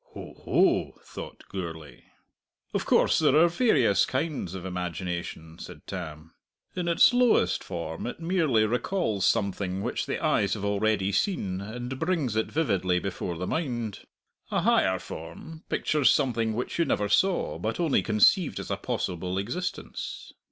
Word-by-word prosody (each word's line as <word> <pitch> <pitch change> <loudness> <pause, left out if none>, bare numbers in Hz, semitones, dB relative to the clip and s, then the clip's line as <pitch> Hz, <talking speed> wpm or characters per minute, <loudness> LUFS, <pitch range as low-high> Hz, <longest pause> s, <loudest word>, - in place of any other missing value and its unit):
"Ho, - - -8
ho!" - - +2
thought - - -9
Gourlay. 80 -7 -7 0.7
"Of - - -1
course - - +4
there - - +4
are 165 +3 +7
various 175 - +3
kinds 130 - -2
of 95 -1 -7
imagination," 90 -2 -5
said 85 -4 -10
Tam. 80 -3 -7 0.4
"In 180 -2 -2
its 170 +8 +5
lowest 245 -1 +3
form 80 +2 -5
it 125 - -6
merely 165 -10 +2
recalls 115 - 0
something 95 -1 0
which - - -2
the - - -1
eyes 100 0 +1
have 100 -1 -4
already 100 -1 +1
seen, 100 - -1
and 120 +5 -6
brings 160 - 0
it 110 - 0
vividly 95 - +1
before 90 -2 -3
the 90 - -3
mind. 120 - -2 0.5
A - - 0
higher - - +3
form 155 - -9
pictures 145 -6 +2
something 115 -5 +1
which 125 +8 -3
you 170 - +4
never 105 - 0
saw, 180 - +1
but 110 +1 -3
only 165 -5 +2
conceived 115 - +3
as - - -6
a - - 0
possible 90 +1 -3
existence. 170 - -5
110 Hz, 150 wpm, -27 LUFS, 90-155 Hz, 0.7 s, are